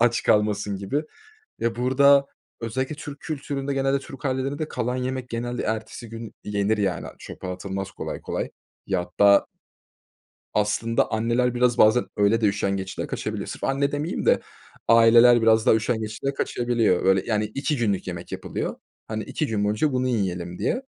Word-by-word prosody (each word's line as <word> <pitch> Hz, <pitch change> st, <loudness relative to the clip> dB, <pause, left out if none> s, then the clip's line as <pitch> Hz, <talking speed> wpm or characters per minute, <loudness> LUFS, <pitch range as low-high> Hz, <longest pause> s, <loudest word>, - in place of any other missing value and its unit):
aç 120 Hz, 0 st, +3 dB
kalmasın." 105 Hz, -1 st, +2 dB
gibi. 100 Hz, +10 st, -2 dB, 0.6 s
Ya, 115 Hz, 0 st, -1 dB
burada 140 Hz, +3 st, +5 dB, 0.3 s
özellikle 130 Hz, +5 st, -2 dB
Türk 145 Hz, -1 st, -9 dB
kültüründe 140 Hz, -2 st, -3 dB
genelde 135 Hz, 0 st, +1 dB
Türk 135 Hz, 0 st, -11 dB
ailelerinde 140 Hz, +3 st, -1 dB
kalan 125 Hz, +2 st, -2 dB
yemek 130 Hz, 0 st, -3 dB
genelde 120 Hz, +1 st, -3 dB
ertesi 110 Hz, +1 st, -4 dB
gün 115 Hz, 0 st, -8 dB
yenir, 105 Hz, +1 st, 0 dB
yani, 95 Hz, -4 st, -1 dB
çöpe -, -, -9 dB
atılmaz 95 Hz, +1 st, -4 dB
kolay -, -, -6 dB
kolay. -, -, -3 dB, 0.4 s
Ya, 95 Hz, -2 st, 0 dB
hatta 100 Hz, +3 st, +4 dB, 1.1 s
Aslında 105 Hz, +3 st, +1 dB
anneler, 120 Hz, +2 st, +1 dB
biraz, 125 Hz, -1 st, +2 dB
bazen, 110 Hz, +3 st, +5 dB
öyle 105 Hz, +3 st, +3 dB
de, -, -, +3 dB
üşengeçliğe 100 Hz, -1 st, -2 dB
kaçabilir. -, -, -4 dB
Sırf -, -, -7 dB
anne 140 Hz, +1 st, +1 dB
demeyeyim 150 Hz, +4 st, -2 dB
de -, -, +5 dB, 0.5 s
aileler 115 Hz, +1 st, +7 dB
biraz 110 Hz, 0 st, +4 dB
daha -, -, +6 dB
üşengeçliğe 110 Hz, +4 st, -2 dB
kaçabiliyor. 120 Hz, -8 st, +1 dB
Böyle, 95 Hz, 0 st, +4 dB
yani, 105 Hz, -2 st, 0 dB
2 140 Hz, +6 st, -2 dB
günlük 100 Hz, -6 st, 0 dB
yemek 85 Hz, -1 st, -6 dB
yapılıyor. -, -, -4 dB, 0.3 s
Hani, 110 Hz, 0 st, -3 dB
2 150 Hz, +8 st, -2 dB
gün 105 Hz, -4 st, -1 dB
boyunca 105 Hz, +9 st, +1 dB
bunu 130 Hz, 0 st, +1 dB
yiyelim 90 Hz, -7 st, -2 dB
diye. 250 Hz, +2 st, 0 dB
115 Hz, 155 wpm, -24 LUFS, 105-130 Hz, 1.1 s, aileler